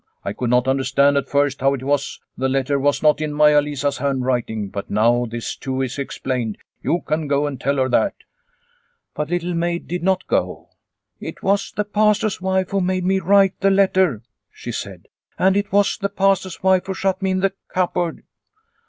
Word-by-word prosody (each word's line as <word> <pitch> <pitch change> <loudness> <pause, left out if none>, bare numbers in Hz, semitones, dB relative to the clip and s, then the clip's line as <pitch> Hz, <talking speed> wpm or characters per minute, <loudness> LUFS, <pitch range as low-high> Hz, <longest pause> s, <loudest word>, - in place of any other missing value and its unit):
"I 100 - -2
could 125 +1 -3
not 125 +1 +2
understand 135 +1 +2
at 140 - -2
first 140 -1 +1
how 135 +1 +3
it 130 - -8
was 140 0 -1 0.2
the 130 +1 -1
letter 135 +1 0
was 145 +2 +1
not 150 0 +4
in 155 -1 -2
Maia 150 0 +5
Lisa's 145 -1 -2
hand 135 -2 -1
writing, 110 -5 -1
but 100 +1 -6
now 120 +3 +2
this 115 0 -5
too 130 0 -4
is 130 +2 -4
explained. 125 -5 -3 0.2
You 175 - 0
can 155 0 -1
go 140 +1 +1
and 140 -4 -5
tell 140 +2 +1
her 130 -1 +2
that." 120 - +2 1.0
But 150 0 -3
Little 175 0 -1
Maid 170 0 -2
did 180 +1 -3
not 190 +1 +1
go. - - -2 0.2
" - - -57
It - - -8
was 200 0 +1
the 210 - -2
Pastor's 210 -1 +1
wife 190 0 0
who 195 -1 +1
made 185 0 -1
me 190 +1 +2
write 195 +1 +3
the 195 - +3
letter," 190 - +2 0.3
she - - -7
said. - - -7
" - - -45
And 190 +1 +3
it 200 0 -1
was 200 0 +2
the 200 - -1
Pastor's 195 -3 0
wife 190 -1 +3
who 190 - -3
shut 190 0 -1
me 190 - 0
in 185 0 0
the 195 0 +1
cupboard." 180 -2 -1
150 Hz, 205 wpm, -21 LUFS, 135-190 Hz, 1.0 s, Maia